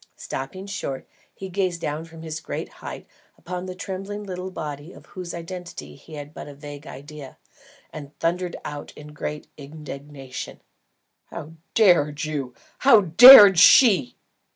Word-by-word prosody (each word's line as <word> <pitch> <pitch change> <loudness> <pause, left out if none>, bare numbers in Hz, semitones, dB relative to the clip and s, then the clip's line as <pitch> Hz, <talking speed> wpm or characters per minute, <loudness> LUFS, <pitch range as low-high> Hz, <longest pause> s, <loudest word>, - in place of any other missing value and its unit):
Stopping 160 +9 -7
short, 200 -10 -6 0.2
he 195 - -9
gazed 185 -2 -2
down 155 +1 -4
from 165 0 -13
his 160 -1 -6
great - - -6
height - - -8 0.3
upon 180 +1 -7
the 185 - -7
trembling 195 +3 -7
little 185 -1 -6
body 150 -2 -8
of - - -16
whose 180 -3 -8
identity 170 - -9
he 155 - -14
had 145 0 -9
but - - -9
a 145 - -11
vague 145 0 -11
idea, 145 +1 -11 0.6
and 145 -1 -11
thundered 175 +2 -2
out 145 -1 -7
in 150 0 -12
great 150 0 -6
indignation: 140 -2 -9 0.7
"How 150 - -9 0.2
dared 170 -7 +3
you! 140 -5 -5 0.2
How 235 -5 +6
dared 200 +1 +9
she!" 185 - +5
160 Hz, 145 wpm, -23 LUFS, 145-185 Hz, 0.7 s, dared